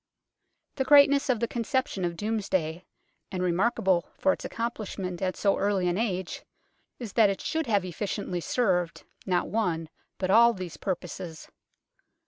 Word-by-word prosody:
The 265 Hz, -, +2 dB
greatness 280 Hz, 0 st, +6 dB
of 245 Hz, -4 st, +2 dB
the 235 Hz, -, +1 dB
conception 235 Hz, -2 st, -1 dB
of 170 Hz, -1 st, -3 dB
Domesday, 190 Hz, -6 st, -1 dB, 0.5 s
and 185 Hz, -2 st, -2 dB
remarkable 185 Hz, 0 st, +1 dB
for 285 Hz, -, +3 dB
its -, -, -8 dB
accomplishment 205 Hz, -6 st, -4 dB
at 185 Hz, -1 st, -1 dB
so 200 Hz, -1 st, +2 dB
early 195 Hz, -2 st, +1 dB
an 175 Hz, -, +1 dB
age, 190 Hz, -5 st, -2 dB, 0.6 s
is 230 Hz, -5 st, -7 dB
that 220 Hz, -3 st, +5 dB
it 195 Hz, -, -2 dB
should 320 Hz, -2 st, -2 dB
have 205 Hz, -4 st, +2 dB
efficiently 185 Hz, 0 st, -3 dB
served, 180 Hz, -6 st, 0 dB, 0.2 s
not 180 Hz, -2 st, +1 dB
one, 165 Hz, -6 st, -1 dB, 0.3 s
but 185 Hz, 0 st, -1 dB
all 235 Hz, +2 st, +7 dB
these 185 Hz, -5 st, -7 dB
purposes. 175 Hz, -3 st, -5 dB
195 Hz, 145 wpm, -27 LUFS, 180-230 Hz, 0.6 s, all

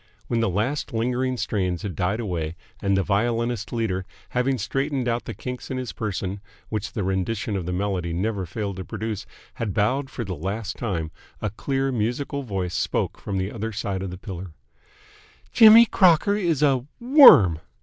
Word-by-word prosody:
When 120 Hz, -, -1 dB
the 115 Hz, -, +1 dB
last 120 Hz, +10 st, -2 dB
lingering 125 Hz, +3 st, 0 dB
strains 95 Hz, -5 st, -1 dB
had 100 Hz, -5 st, -4 dB
died 95 Hz, +6 st, -1 dB
away 85 Hz, -7 st, -3 dB, 0.3 s
and 100 Hz, -1 st, +2 dB
the 95 Hz, -, +2 dB
violinist 115 Hz, +4 st, 0 dB
leader, 110 Hz, -6 st, -1 dB, 0.3 s
having 130 Hz, +2 st, 0 dB
straightened 135 Hz, +3 st, -1 dB
out 120 Hz, 0 st, -1 dB
the 115 Hz, -, -6 dB
kinks 125 Hz, +4 st, -6 dB
in 130 Hz, -, -3 dB
his 130 Hz, -2 st, -4 dB
person 100 Hz, -2 st, -4 dB, 0.3 s
which 110 Hz, -1 st, -3 dB
the 105 Hz, -, -2 dB
rendition 100 Hz, +3 st, -1 dB
of 90 Hz, -3 st, -3 dB
the -, -, -1 dB
melody 90 Hz, -2 st, -2 dB
never 95 Hz, +2 st, -2 dB
failed 100 Hz, +1 st, -4 dB
to 95 Hz, -, -4 dB
produce, 110 Hz, 0 st, -5 dB, 0.3 s
had 105 Hz, -4 st, -2 dB
bowed 130 Hz, +6 st, +1 dB
for 125 Hz, -, -5 dB
the 95 Hz, -4 st, -4 dB
last 100 Hz, +7 st, -4 dB
time, 85 Hz, -9 st, -3 dB, 0.3 s
a 105 Hz, -, -2 dB
clear, 135 Hz, +5 st, -1 dB
musical 125 Hz, +5 st, -2 dB
voice 95 Hz, -8 st, -3 dB
spoke -, -, -1 dB
from 100 Hz, -, -4 dB
the 95 Hz, +2 st, -2 dB
other 110 Hz, 0 st, -4 dB
side 100 Hz, -3 st, -3 dB
of 95 Hz, -, -4 dB
the 90 Hz, -, -7 dB
pillar. 95 Hz, -3 st, -8 dB, 1.0 s
"Jimmy 225 Hz, 0 st, +9 dB
Crocker 190 Hz, -1 st, +4 dB
is 170 Hz, -8 st, 0 dB
a 135 Hz, -4 st, +3 dB, 0.2 s
WORM!" 235 Hz, -, +8 dB
110 Hz, 180 wpm, -24 LUFS, 95-125 Hz, 1.0 s, Jimmy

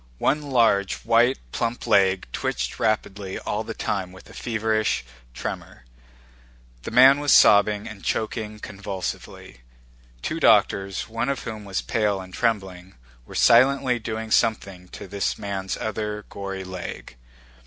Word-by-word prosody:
One 150 Hz, -, +1 dB
large, 115 Hz, -8 st, +2 dB
white, 120 Hz, +3 st, +3 dB
plump 115 Hz, 0 st, -2 dB
leg 95 Hz, -4 st, +3 dB
twitched -, -, -3 dB
rapidly 100 Hz, -3 st, -1 dB
all 105 Hz, +2 st, -3 dB
the 115 Hz, 0 st, -7 dB
time 95 Hz, -3 st, -3 dB
with 95 Hz, -, -15 dB
a -, -, -14 dB
feverish 110 Hz, -, -1 dB, 0.3 s
tremor. -, -, -7 dB, 1.0 s
The -, -, -6 dB
man 130 Hz, +4 st, +7 dB
was 145 Hz, -1 st, +1 dB
sobbing 105 Hz, 0 st, +5 dB
and 105 Hz, -3 st, -10 dB
choking 110 Hz, -1 st, -2 dB
convulsively. 100 Hz, -, -7 dB, 0.6 s
Two -, -, -2 dB
doctors—one 100 Hz, +6 st, +2 dB
of 140 Hz, -, -2 dB
whom 110 Hz, -3 st, -7 dB
was 95 Hz, -2 st, -3 dB
pale 105 Hz, -3 st, 0 dB
and 95 Hz, -1 st, -10 dB
trembling—were 90 Hz, -, -4 dB
silently 130 Hz, +1 st, +4 dB
doing 110 Hz, 0 st, -5 dB
something 100 Hz, -6 st, 0 dB
to 95 Hz, -, -10 dB
this 100 Hz, +1 st, -2 dB
man's 95 Hz, -1 st, -4 dB
other, 105 Hz, -1 st, -4 dB
gory 95 Hz, -1 st, -5 dB
leg. 95 Hz, -7 st, -8 dB
105 Hz, 130 wpm, -24 LUFS, 95-115 Hz, 1.0 s, man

